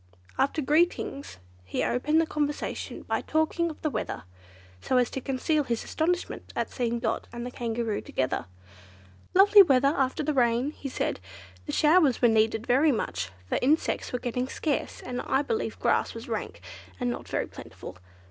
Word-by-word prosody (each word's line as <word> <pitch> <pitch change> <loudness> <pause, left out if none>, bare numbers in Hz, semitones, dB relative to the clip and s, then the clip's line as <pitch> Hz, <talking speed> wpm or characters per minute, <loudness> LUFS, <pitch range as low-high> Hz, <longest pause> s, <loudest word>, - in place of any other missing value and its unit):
After 280 +3 +1
greetings, 300 - 0 0.3
he 95 - -2
opened 300 +6 +2
the 325 - +3
conversation 295 -2 -3
by - - -1
talking 315 +2 0
of 310 - -9
the 310 - +1
weather, - - -4 0.6
so 260 - +1
as 250 -1 +2
to 265 - -4
conceal 285 +4 0
his 235 -4 -2
astonishment 355 +3 -2
at - - -2
seeing 235 -2 -1
Dot 230 -2 -2
and 235 0 -6
the 250 - -5
the - - -21
Kangaroo 230 -2 -2
together. 130 -9 -2 0.9
"Lovely 405 +2 +9
weather 275 -6 +5
after 270 +2 0
the 305 - 0
rain," 245 +1 +2
he 280 -2 -7
said; - - -2 0.5
"the - - -2
showers 300 -4 +4
were 240 - +5
needed 220 0 +2
very 275 +6 +4
much, 95 - -2 0.2
for - - 0
insects 295 +5 +1
were 250 - -1
getting 250 +1 -2
scarce, 290 +2 -2
and 250 0 -4
I 270 +2 +1
believe 445 +9 -2
grass - - +1
was - - -8
rank, - - -4 0.4
and 245 -1 0
not - - -6
very - - -1
plentiful. 90 - -10
265 Hz, 175 wpm, -27 LUFS, 240-310 Hz, 0.9 s, Lovely